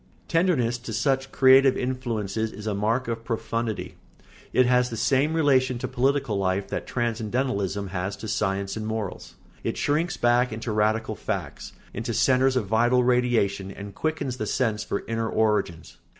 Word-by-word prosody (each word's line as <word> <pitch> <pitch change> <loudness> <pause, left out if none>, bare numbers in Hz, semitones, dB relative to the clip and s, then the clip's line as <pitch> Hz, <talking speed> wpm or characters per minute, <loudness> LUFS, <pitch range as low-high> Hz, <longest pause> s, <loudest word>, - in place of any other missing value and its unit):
] - - -33
Tenderness 145 -9 +1
to 115 -2 -7
such 135 +4 0
creative 135 0 +6
influences 110 -4 -2
is 105 +1 -9
a 110 - -1
mark 110 +5 0
of 115 -1 -3
profundity; 115 -1 -3 0.5
it 130 - +4
has 125 0 +3
the 115 - -5
same 140 +7 +2
relation 130 -5 +3
to - - -3
political 130 -4 0
life 95 +1 -1
that - - -4
transcendentalism 110 -4 -1
has 95 +2 -3
to 110 - -7
science 100 -2 -1
and 110 -1 -4
morals; 110 -3 -5 0.3
it - - -2
shrinks 155 +5 0
back 120 +1 +3
into 110 +1 -4
radical 110 +1 +1
facts, 105 - -5 0.2
into - - -3
centres 130 0 +3
of 125 -5 +1
vital 120 +4 +3
radiation, 120 -6 +1
and 100 +1 -8
quickens 145 -2 -2
the 110 - -3
sense 110 -4 0
for - - -3
inner 115 0 -2
origins. 105 -7 0
115 Hz, 165 wpm, -25 LUFS, 105-130 Hz, 0.5 s, creative